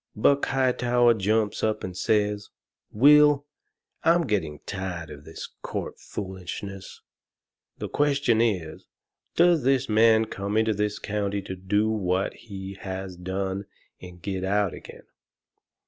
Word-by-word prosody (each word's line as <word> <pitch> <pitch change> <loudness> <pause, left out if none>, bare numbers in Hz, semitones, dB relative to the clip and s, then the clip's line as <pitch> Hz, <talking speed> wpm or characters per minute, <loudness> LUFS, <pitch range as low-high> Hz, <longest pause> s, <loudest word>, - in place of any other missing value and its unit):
Buck 140 +6 +3
Hightower 125 -2 +3
jumps 105 0 0
up 110 -1 0
and 90 -1 -5
says: 105 0 0 0.4
"Will, 145 +4 +6 0.6
I'm 170 0 +4
getting 85 - -1
tired 95 -5 -5
of 75 0 -11
this 80 - -8
court - - -5
foolishness. 95 0 -7 0.8
The - - -4
question 140 -6 +2
is, 90 -9 -1 0.5
Does 170 -2 +5
this 135 0 +2
man 110 0 +5
come 100 0 -3
into 110 0 +3
this 105 0 -1
county 100 -1 -2
and 95 0 -8
do 105 +2 +3
what 95 -3 0
he 100 -2 -9
has 95 -1 -5
done 95 +2 -3 0.4
and 90 -1 -11
get 95 +1 -4
out 100 0 +1
again? - - -11
105 Hz, 130 wpm, -26 LUFS, 95-115 Hz, 0.8 s, Will